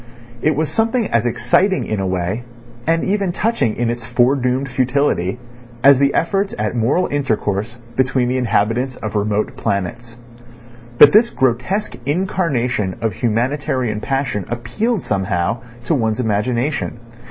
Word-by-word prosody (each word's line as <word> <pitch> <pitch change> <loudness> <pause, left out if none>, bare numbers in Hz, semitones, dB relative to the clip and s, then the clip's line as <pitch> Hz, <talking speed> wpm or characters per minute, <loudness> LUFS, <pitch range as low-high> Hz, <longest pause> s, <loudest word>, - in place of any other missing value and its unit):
It 155 -1 +2
was 155 +1 0
something 225 +1 +1
as 115 +1 +2
exciting 180 - +1
in 110 - -2
a 95 - -1
way, 95 +5 -2 0.4
and 165 0 +2
even 195 -2 0
touching 210 - 0
in 120 -1 0
its 120 0 -5
foredoomed 125 +2 +1
futility, 125 -6 +1 0.5
as 140 -1 +7
the 140 0 +2
efforts 195 +4 0
at 105 +2 -2
moral 125 +11 +2
intercourse 115 -5 -1 0.2
between 130 -1 +1
the 130 +1 0
inhabitants 120 +3 0
of 110 - -6
remote 105 0 0
planets. 115 +5 -3 0.8
But 145 - +9
this 225 +3 +5
grotesque 130 - -1
incarnation 140 - 0
of 110 -3 -1
humanitarian 120 0 -1
passion 135 -6 -2
appealed 125 - -2
somehow, 95 +2 -1 0.3
to 120 - +1
one's 110 -5 0
imagination. 120 +5 -1
125 Hz, 135 wpm, -19 LUFS, 110-145 Hz, 0.8 s, But